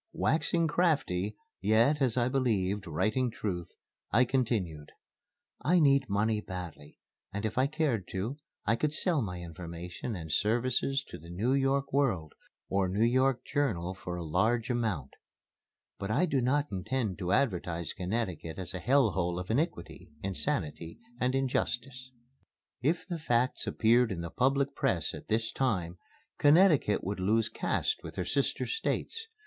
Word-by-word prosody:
Waxing 165 +1 +1
crafty, 140 - +1 0.3
yet, 115 +9 +3
as 130 -3 +2
I 120 -1 +3
believed, 105 -7 0
writing 110 +11 +1
truth, 90 -6 -4 0.4
I 125 +4 +5
continued: 110 - -1 0.7
"I 180 +3 +4
need 140 -4 +4
money 105 +2 +1
badly, 90 -7 -8 0.3
and 100 +2 -3
if 110 - -2
I 130 +2 +3
cared 145 - -1
to, 110 +9 -2 0.3
I 115 - +3
could 150 +5 -1
sell 165 -5 +2
my 90 -5 -4
information 85 +5 -6
and 80 -4 -6
services 125 - +1
to - - -8
the 85 +2 -13
New 105 +9 0
York 135 0 +1
World 105 - +1 0.3
or 95 -1 +1
New 105 +5 +2
York 130 +1 +2
Journal 100 - -1
for 90 -2 -6
a 85 -1 -5
large 110 +9 +1
amount. 105 - -1 0.9
But 100 - -4
I 140 +12 +3
do 140 -6 +1
not 145 +4 +1
intend 100 +1 -2
to 90 -2 -2
advertise 85 - 0
Connecticut 90 -4 -3
as 95 -1 -5
a 90 - -4
Hell 125 +3 +3
hole 90 -1 -1
of 90 +3 -4
Iniquity, 135 - -2
Insanity, 80 -3 -2 0.2
and 130 +1 +1
Injustice. 130 -1 -1 0.7
If 155 +7 +1
the 175 -3 -3
facts 125 -4 0
appeared 115 +1 +3
in 85 -3 -3
the 85 -1 -5
public 135 +2 +1
press 95 - 0
at - - -9
this 110 +1 0
time, 90 -11 -1 0.4
Connecticut 150 - +5
would 100 +1 -3
lose 110 +4 +2
caste 440 - -1
with - - -9
her - - -2
sister - - 0
States. 450 0 -2
115 Hz, 155 wpm, -30 LUFS, 90-135 Hz, 0.9 s, I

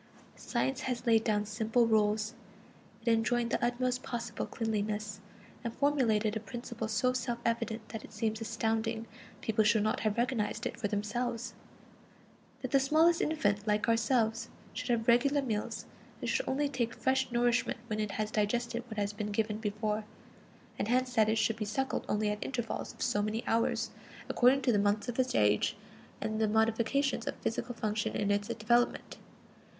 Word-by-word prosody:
Science 235 - -2
laid 225 -2 +4
down 210 -2 +1
simple 220 +3 +2
rules; 215 0 +2 0.7
it 235 - +4
enjoined 235 +1 +1
the - - 0
utmost 250 +1 0
possible 235 -2 -4
cleanliness, 210 -2 -2 0.4
and 230 -1 -4
formulated 230 -7 +2
a - - 0
principle 235 0 -5
so 250 +4 +1
self 240 -1 -2
evident 230 -1 -1
that 220 -1 -6
it - - -12
seems 220 +1 -2
astounding 225 0 -1 0.4
people 220 -1 +2
should 215 0 +4
not 215 - +1
have 215 0 0
recognized 235 -1 0
it - - -2
for 230 - -2
themselves: 230 +3 -2 1.1
that - - -3
the 275 - +5
smallest 315 +5 +4
infant, 205 -9 0
like 210 +1 +2
ourselves, 230 0 +2 0.2
should 250 +1 -5
have 230 -2 +1
regular 270 +5 +4
meals, 220 -6 -2 0.3
and - - -4
should - - 0
only 285 +2 +1
take 240 -4 -2
fresh 265 -1 +1
nourishment 240 0 +2
when 215 -2 -3
it 210 -2 -1
has 215 +1 -2
digested 235 +3 0
what 220 -2 -8
has 205 0 0
been 210 0 -4
given 215 0 0
before; 210 0 -1 0.8
and - - 0
hence 250 +1 +1
that 220 -3 +4
it 220 - +2
should 220 0 +1
be 220 - -2
suckled 220 +6 -2
only 210 0 +1
at 210 - -3
intervals 240 -4 -3
of - - -6
so 205 - +1
many 215 +2 -2
hours, 230 0 +1 0.4
according 260 +2 +4
to 255 - +4
the 210 - +3
months 205 +1 +1
of 245 +1 -3
its 255 0 +1
age 105 -1 +3 0.4
and 215 0 -2
the 220 - +4
modifications 230 +4 +1
of - - -2
physical 235 +2 -3
function 215 -1 -1
in 205 -1 +1
its 205 0 +1
development. 235 +1 +1
225 Hz, 170 wpm, -32 LUFS, 215-240 Hz, 1.1 s, the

